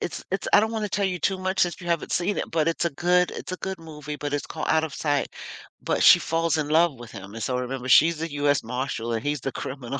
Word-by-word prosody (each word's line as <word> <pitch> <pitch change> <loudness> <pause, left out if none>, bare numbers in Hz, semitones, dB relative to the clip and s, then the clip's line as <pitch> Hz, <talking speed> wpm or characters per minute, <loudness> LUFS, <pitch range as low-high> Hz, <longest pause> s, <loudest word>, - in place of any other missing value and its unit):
it's 175 - -5
it's 195 - -2
I - - +8
don't 220 +1 0
wanna 215 -2 -2
tell 200 +1 -1
you 185 -2 -1
too 190 +2 0
much 185 +1 -2
since 175 -1 +1
you 175 - -7
haven't 170 -2 -1
seen 190 +4 0
it, - - -3
but 160 0 +1
it's 165 - -1
a - - 0
good 180 +4 +2
it's - - -7
a - - -2
good 190 -1 -4
movie, 150 -2 -8
but 145 0 -4
it's 145 - -2
called 155 - -5
Out 160 0 +3
of 150 - -6
Sight. 145 -2 0 0.5
But - - 0
she - - +9
falls 165 -1 0
in 150 -2 -1
love 160 0 +3
with 120 -2 -10
him, 100 0 -10
and 115 - -6
so, 125 -1 -1
remember, 125 0 -4
she's 160 +5 +6
the 165 -1 -4
US 145 -1 +2
marshal, 125 -1 -3
and 110 -1 -2
he's 145 +1 -1
the 135 - -3
criminal. 135 0 -5
155 Hz, 275 wpm, -25 LUFS, 135-175 Hz, 0.5 s, she